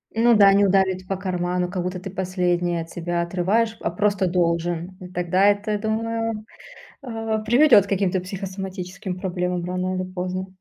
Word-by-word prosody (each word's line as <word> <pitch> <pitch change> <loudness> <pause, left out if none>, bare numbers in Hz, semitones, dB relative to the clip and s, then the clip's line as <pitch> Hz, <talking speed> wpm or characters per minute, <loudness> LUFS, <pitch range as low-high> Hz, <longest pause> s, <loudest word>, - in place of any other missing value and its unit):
Ну 235 +1 +5
да, 200 -2 +7
не 200 +1 +4
ударит 190 -1 +1
по 195 - -1
карману, 180 -1 -1
как 185 -1 -2
будто 180 0 -3
ты 190 - -7
последнее 180 -2 0
от 165 - -9
себя 175 0 -2
отрываешь, 195 +6 0
а - - 0
просто 200 +1 +1
должен. 175 0 -1 0.2
Тогда 180 +2 +2
это, 205 +1 +1
думаю, 225 0 -2 0.6
а, 225 -3 -3
приведёт 225 -1 +5
к - - -16
каким-то 190 -1 +1
психосоматическим 185 0 -6
проблемам 180 -1 -2
рано 185 +1 -2
или 185 0 -4
поздно. 185 +1 -3
185 Hz, 160 wpm, -23 LUFS, 180-205 Hz, 0.6 s, да